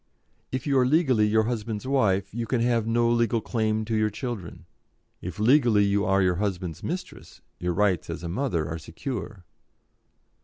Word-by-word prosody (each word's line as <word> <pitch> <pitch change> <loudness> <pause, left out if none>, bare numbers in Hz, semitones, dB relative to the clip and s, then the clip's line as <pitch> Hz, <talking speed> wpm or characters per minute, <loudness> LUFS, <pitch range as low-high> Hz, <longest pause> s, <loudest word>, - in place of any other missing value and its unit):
If 130 -1 -3
you 140 -3 +3
are 125 - +4
legally 130 -8 +3
your 110 +1 +3
husband's 110 -1 -3
wife, 100 -9 +1
you 115 0 -3
can 125 - 0
have 115 -2 +1
no 115 +1 +2
legal 115 -1 +2
claim 110 -1 -1
to 115 0 -2
your 110 0 +2
children; 105 -5 -6 0.6
if 90 0 -6
legally 115 -2 +4
you 100 +1 +1
are 95 -1 +3
your 90 -1 +2
husband's 90 -5 -3
mistress, 180 +3 -6 0.2
your 90 0 -1
rights 95 -3 +1
as - - -5
mother 85 - -1
are 80 +1 -4
secure." 95 - -6
110 Hz, 165 wpm, -26 LUFS, 95-120 Hz, 0.6 s, are